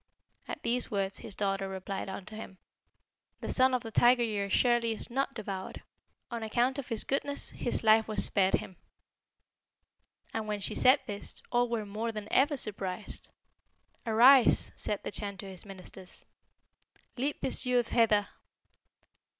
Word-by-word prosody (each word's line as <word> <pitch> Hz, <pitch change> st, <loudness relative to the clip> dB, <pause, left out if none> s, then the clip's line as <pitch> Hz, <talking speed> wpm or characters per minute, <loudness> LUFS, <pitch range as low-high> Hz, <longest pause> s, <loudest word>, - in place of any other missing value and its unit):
At -, -, -6 dB
these 245 Hz, +1 st, 0 dB
words 195 Hz, -1 st, -2 dB
his 205 Hz, -, -6 dB
daughter 195 Hz, -1 st, -1 dB
replied 190 Hz, +1 st, -5 dB
unto 195 Hz, +2 st, -7 dB
him, 205 Hz, -3 st, -9 dB, 0.8 s
'The -, -, -6 dB
Son 260 Hz, 0 st, +4 dB
of 250 Hz, -, -2 dB
the 225 Hz, -, -7 dB
Tiger 240 Hz, +2 st, +5 dB
year 210 Hz, -3 st, -1 dB
assuredly 235 Hz, +3 st, +2 dB
is 220 Hz, -, -4 dB
not 270 Hz, +2 st, -1 dB
devoured. 195 Hz, -4 st, -6 dB, 0.5 s
On 235 Hz, -1 st, -4 dB
account 240 Hz, +5 st, 0 dB
of 270 Hz, -, -6 dB
his 230 Hz, -3 st, +1 dB
goodness 285 Hz, +1 st, -2 dB
his 240 Hz, -, 0 dB
life 220 Hz, 0 st, +5 dB
was 215 Hz, -1 st, +2 dB
spared 190 Hz, -2 st, +3 dB
him.' 185 Hz, -, -6 dB, 1.6 s
"And 220 Hz, -1 st, -3 dB
when 210 Hz, -1 st, -2 dB
she 195 Hz, -, -2 dB
said 260 Hz, +3 st, +5 dB
this, 205 Hz, -1 st, -4 dB
all 245 Hz, 0 st, +2 dB
were 230 Hz, -3 st, -2 dB
more 215 Hz, +3 st, -3 dB
than 215 Hz, -1 st, -6 dB
ever 285 Hz, +2 st, +4 dB
surprised. 200 Hz, -3 st, -5 dB, 0.7 s
'Arise!' 240 Hz, +3 st, +6 dB
said 205 Hz, -, -3 dB
the -, -, -4 dB
Chan 200 Hz, -1 st, -4 dB
to 195 Hz, -, -7 dB
his 190 Hz, -1 st, -7 dB
ministers, 190 Hz, -1 st, -10 dB, 0.9 s
'lead 275 Hz, +4 st, -1 dB
this 260 Hz, -, 0 dB
youth 245 Hz, -2 st, +2 dB
hither.' 215 Hz, -3 st, +3 dB
220 Hz, 155 wpm, -30 LUFS, 200-245 Hz, 1.6 s, Arise